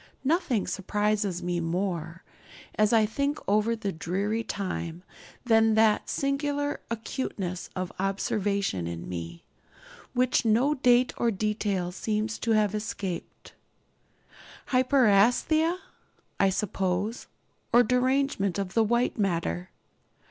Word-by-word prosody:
Nothing 275 - +1
surprises 200 0 -1
me 175 0 -1
more, 170 -1 -3 0.5
as 215 -1 +2
I 225 -2 +5
think 280 +7 -1
over 210 +2 +2
all 230 - 0
that 195 -6 -4
dreary 205 +7 -1
time, 180 -4 -4 0.4
than 225 -2 +4
the 220 -1 +4
singular 285 +1 -1
acuteness 215 -6 -4
of 185 -1 -3
observation 195 - -1
in 85 0 -6
me, 85 -1 -6 0.7
which 250 0 +2
no 235 +6 +3
date 250 -2 +3
or 235 - +2
detail 205 -3 -1
seems 215 +3 -2
to 230 - +1
have 210 -2 +2
escaped. 205 -4 -5 1.2
'Hyperæsthesia,' 255 - +3 0.6
I 195 - +4
suppose, 195 +2 -2 0.4
or 240 +1 +6
derangement 250 -5 +1
of 195 -2 -3
the 225 - +4
white 235 +2 +1
matter. 165 - -1
210 Hz, 110 wpm, -27 LUFS, 185-240 Hz, 1.2 s, or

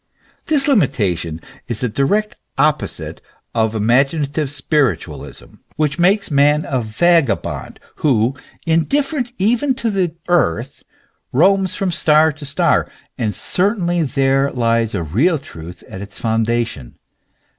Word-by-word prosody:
"f - - -37
This 295 -3 +1
limitation 95 - +1 0.3
is 120 -3 -3
the 125 - +1
direct 200 - 0 0.2
opposite 150 +2 -1 0.3
of 110 -1 0
imaginative 140 +6 +1
spiritualism, 145 -1 -2 0.2
which 150 +1 -1
makes 195 +1 +2
man 145 +2 +3
a 130 -2 0
vagabond, 150 +6 0 0.2
who, 125 -4 +2 0.3
indifferent 255 - 0
even 240 +7 +1
to 235 -3 -1
the 185 -5 -1
earth, 175 - 0 0.5
roams 190 +6 +3
from 195 -2 -1
star 155 -1 +4
to 150 0 -10
star; 140 - +1 0.3
and 105 -4 -1
certainly 180 -3 +1
there 135 -1 +1
lies 115 -3 0
a 90 - -2
real 130 - +2
truth 85 - -11
at 95 - -8
its 100 -1 -9
foundation. 115 - -1
145 Hz, 125 wpm, -18 LUFS, 115-175 Hz, 0.5 s, star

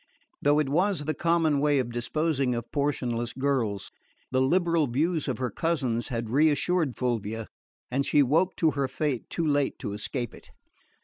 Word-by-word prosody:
Though 145 +1 +4
it 150 -2 +2
was 170 +2 +1
the 155 - 0
common 165 -2 +2
way 145 0 +3
of 125 -3 -1
disposing 135 +1 0
of 120 0 -5
portionless 125 -5 -1
girls, 125 -7 -1 0.4
the 130 0 +2
liberal 170 +2 +2
views 155 +6 0
of 130 -5 -1
her 125 -3 -2
cousins 130 -6 -1
had 115 -2 -3
reassured 155 +1 +2
Fulvia, 115 -3 -2 0.5
and 135 +2 +1
she 145 +1 +4
woke 160 +8 +2
to 160 -2 +2
her 140 -2 -1
fate 135 -1 -2
too 165 - -2
late 145 -2 +1
to 100 - -5
escape 120 +3 -3
it. - - -15
140 Hz, 170 wpm, -27 LUFS, 120-155 Hz, 0.5 s, Though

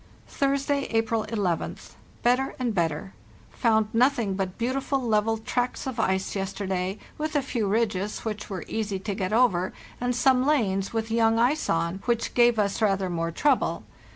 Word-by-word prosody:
"Thursday, 280 0 0
April 225 -1 0
11th. 200 -7 -2 0.3
Better 250 +3 +2
and 245 -3 -1
better. 165 0 -1 0.4
Found 220 -3 +2
nothing 240 -4 +2
but 190 -1 -3
beautiful 265 +3 -1
level 225 -2 +1
tracks 245 +3 -2
of 260 -3 -4
ice 190 -2 0
yesterday, 190 -1 -2 0.2
with 310 0 -2
a 290 - +2
few 235 -6 -1
ridges, 205 -1 0
which 210 -1 -4
were 190 -4 -5
easy 210 -3 -2
to 200 +2 -4
get 190 0 -2
over, 215 -6 +2 0.3
and 245 0 0
some 255 +1 +4
lanes, 205 -10 +1
with 225 0 -2
young 225 0 +3
ice 255 +7 +2
on, 170 +3 0
which 235 -1 0
gave 240 -1 +4
us 205 +1 0
rather 195 -3 +1
more 165 -1 -1
trouble. 265 - +1
220 Hz, 160 wpm, -26 LUFS, 195-245 Hz, 0.4 s, some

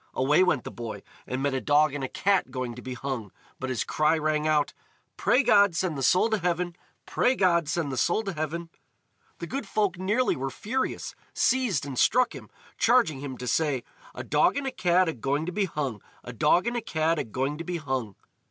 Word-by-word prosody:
Away 140 +6 +3
went 180 -8 +2
the - - -7
boy, 115 -2 -7 0.2
and 130 +1 -3
met 140 -1 +1
a 130 - -1
dog 145 +4 +3
and 145 -2 -4
a - - -1
cat 195 -6 +1
going 130 -2 -4
to 125 - -10
be 130 0 -6
hung, 125 -6 -4 0.3
but 130 - -4
his 125 -3 -1
cry 155 +1 +2
rang 155 0 0
out: 150 -2 +2 0.4
"Pray 270 - +3
God 205 -6 +5
send 180 -2 -1
the 135 - -4
soul 180 - +4
to 220 - +1
heaven! 175 -1 -1 0.3
Pray 255 - +2
God 170 - +2
send 160 -4 -1
the 130 - -4
soul 175 - +1
to 195 -2 -4
heaven!" 165 +2 -4 0.7
The - - -5
good 245 +3 -5
folk 195 -3 0
nearly 210 +7 +1
were 135 0 -3
furious, 235 - -3 0.2
seized 240 - +1
and 135 -3 -4
struck 250 +2 +3
him, - - -10 0.3
charging 230 - +3
him 135 -2 -6
to 125 - -6
say: 135 0 0 0.3
"A - - -5
dog - - +2
and 285 - -2
a 270 - -1
cat 180 -5 +2
agoing 140 +1 -1
to 180 - -3
be 200 +2 0
hung! 140 - -4 0.2
A 125 - -8
dog 150 - +3
and 240 0 -1
a 240 - -1
cat 160 -3 0
agoing 135 +7 -2
to - - -4
be 175 +1 -3
hung!" 130 - -3
155 Hz, 215 wpm, -27 LUFS, 135-185 Hz, 0.7 s, God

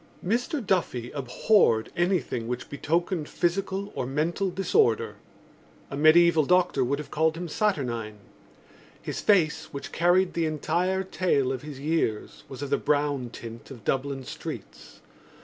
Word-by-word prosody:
Mr 245 - -1
Duffy 130 -11 0
abhorred 130 - +2
anything 175 -10 0
which 125 +1 -5
betokened 165 +2 -1
physical 195 +3 -1
or 125 - -3
mental 165 +8 0
disorder. 115 - +1 0.7
A - - -3
mediæval 155 +1 +5
doctor 180 -7 +3
would 135 +3 0
have 150 - -8
called 160 +1 +1
him 175 +1 -4
saturnine. 125 - -1 0.8
His - - -5
face, 160 -6 +3
which 140 - -7
carried 175 +2 +3
the 165 -1 0
entire 175 +5 0
tale 175 -8 +1
of 130 -2 -3
his 150 -3 -8
years, 145 -7 -2
was 135 +1 -7
of 140 - -5
the - - +3
brown 145 -4 0
tint 115 -1 -10
of 120 -6 -11
Dublin 135 +2 -1
streets. - - -9
155 Hz, 140 wpm, -26 LUFS, 130-180 Hz, 0.8 s, mediæval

